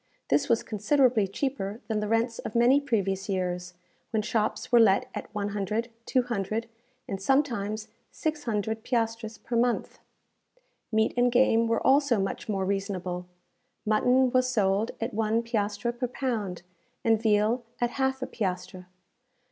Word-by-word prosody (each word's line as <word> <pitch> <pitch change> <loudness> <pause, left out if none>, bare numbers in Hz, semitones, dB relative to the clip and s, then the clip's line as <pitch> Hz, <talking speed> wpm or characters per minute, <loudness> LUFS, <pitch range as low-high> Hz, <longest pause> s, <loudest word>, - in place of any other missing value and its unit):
This - - +2
was 230 -1 +3
considerably 230 0 +2
cheaper 210 -1 -3
than 220 -3 0
the 210 - -2
rents 225 +2 0
of 215 - -6
many 250 +4 +5
previous 200 -7 -1
years, 180 -2 -2 0.3
when 220 -2 0
shops 215 +1 -1
were 240 - +7
let 215 +1 +5
at - - -6
100, 210 +3 -2 0.2
200, 230 -3 0 0.4
and 195 -1 -4
sometimes 215 -4 0 0.2
600 225 - -2
piastres 225 -2 -1
per 240 - -5
month. 240 +1 0 0.9
Meat 220 0 +2
and 245 0 +3
game 235 -2 +4
were 230 0 0
also 275 -4 +4
much 195 +3 -3
more 195 -2 0
reasonable. 185 -2 -3 0.6
Mutton 250 +4 +3
was 255 0 +3
sold 210 -1 +1
at 230 +2 -3
one 220 +2 +1
piastre 215 0 -1
per 245 +1 -3
pound, 220 -9 -3 0.4
and 225 -1 +3
veal 220 +2 +2 0.2
at 240 0 +1
half 265 0 -1
a - - 0
piastre. 185 -4 -4
225 Hz, 140 wpm, -27 LUFS, 200-245 Hz, 0.9 s, were